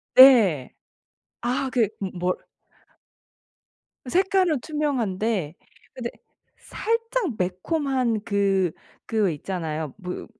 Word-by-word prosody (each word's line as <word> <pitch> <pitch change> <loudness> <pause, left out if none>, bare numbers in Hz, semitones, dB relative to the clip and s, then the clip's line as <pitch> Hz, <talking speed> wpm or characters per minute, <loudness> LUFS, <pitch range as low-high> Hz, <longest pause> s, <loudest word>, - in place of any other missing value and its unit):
네. 220 - +7 0.7
아 250 +3 -1
그 230 -5 +2
뭐 195 -2 -3
뭘 180 0 +1 1.7
색깔은 370 -4 +2
투명한데 225 - -1 0.4
근데 240 -2 -4 0.5
살짝 460 - -2
매콤한 235 - 0
그 195 -4 +1 0.3
그 215 -4 +1
있잖아요. 160 -2 -4
뭐 180 -3 -6
225 Hz, 150 characters per minute, -24 LUFS, 185-275 Hz, 1.7 s, 네